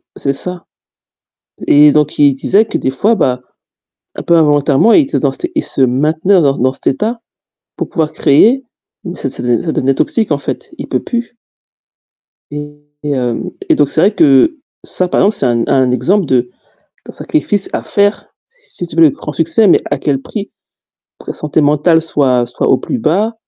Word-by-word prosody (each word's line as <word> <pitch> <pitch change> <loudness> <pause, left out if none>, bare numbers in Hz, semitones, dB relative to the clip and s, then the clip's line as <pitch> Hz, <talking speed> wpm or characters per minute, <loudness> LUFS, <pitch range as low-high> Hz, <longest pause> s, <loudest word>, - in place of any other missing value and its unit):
C'est 140 - -2
ça 180 +4 -6 1.0
et 150 0 +6
donc 150 0 0
il 145 -2 +4
disait 195 +10 +2
que 220 - -4
des - - -2
fois, 205 +13 +1
bah, 125 - -1 0.7
un - - -7
peu 170 - +1
involontairement, 150 +4 +3
il 325 - +6
était 280 - -2
dans 140 - +1
cet 135 - -12
e - - -9
il - - 0
se 135 - -2
maintenait 155 +9 +2
dans 140 -3 +1
dans 130 +1 +1
cet - - -15
état 220 - -1 0.6
pour - - -5
pouvoir 160 -2 -1
créer. 230 - +3 0.4
Mmh 175 -1 -7
ça 135 - -4
ça 130 - -7
de 120 -1 +1
ça 165 - -3
devenait 135 +1 +1
toxique 220 - -1
en 145 - +2
fait. 140 - -6
Il - - -7
peut - - -2
plus 240 0 -4 1.2
et 145 0 -7 0.3
et 150 - -3
hem, 125 -3 -2 0.2
et - - +4
donc 145 - +2
c'est 155 - -1
vrai 200 - +4
que 150 - +3 0.3
ça 185 - -2
par - - 0
exemple 210 +2 +2
c'est - - -1
un 120 -2 +1
un 130 -2 +2
exemple 180 +10 +1
de 125 -3 0 0.6
d'un - - -10
sacrifice 205 -10 -2
à - - -3
faire, 205 +1 0 0.2
si 485 - -9
tu 170 - -11
veux 165 - +5
le 155 - +6
grand 150 - -8
succès, 165 +8 +2
mais - - +4
à 145 - -1
quel 135 -1 -1
prix? 205 +7 -7 0.7
Que - - -15
ta - - -4
santé 150 +1 -2
mentale 150 +3 +2
soit 130 -6 +1
soit 120 - -3
au 130 - +4
plus 255 - -4
bas, 205 +6 0
150 Hz, 200 wpm, -13 LUFS, 135-195 Hz, 1.2 s, et